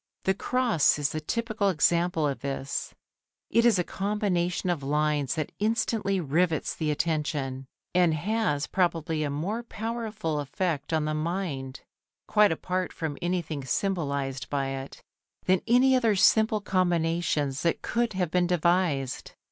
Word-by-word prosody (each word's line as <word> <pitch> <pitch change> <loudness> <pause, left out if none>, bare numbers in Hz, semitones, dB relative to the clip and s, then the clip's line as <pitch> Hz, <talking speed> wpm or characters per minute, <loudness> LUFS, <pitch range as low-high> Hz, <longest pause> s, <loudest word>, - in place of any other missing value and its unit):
The 190 - +2
cross 235 - +2
is 145 -1 0
the 155 - -3
typical 220 +3 -1
example 170 -2 +2
of 140 - -3
this. 140 0 -3 0.6
It 230 - +4
is 225 -5 +4
a 180 - +2
combination 185 -3 -1
of 165 -5 -2
lines 150 0 0
that 155 -3 -3
instantly 215 -2 0
rivets 160 +1 0
the 155 -2 -2
attention, 150 -4 -1 0.3
and 180 -2 +4
has 165 -4 0
probably 165 -3 0
a 150 - 0
more 175 +11 -2
powerful 220 -8 -3
effect 145 +1 -2
upon 160 -1 +1
the 155 - -1
mind 155 -5 -3 0.5
quite 210 -3 +5
apart 180 +3 -2
from 160 -3 -4
anything 170 -5 -2
symbolised 140 -4 -2
by 140 -2 -1
it 135 0 -7 0.4
than 185 -1 +3
any 255 +3 +5
other 230 -5 +3
simple 220 +2 +4
combinations 170 -7 0
that 170 - 0
could 235 -1 0
have 180 -4 -1
been 180 -1 +2
devised. 170 -6 0
170 Hz, 140 wpm, -27 LUFS, 150-195 Hz, 0.6 s, quite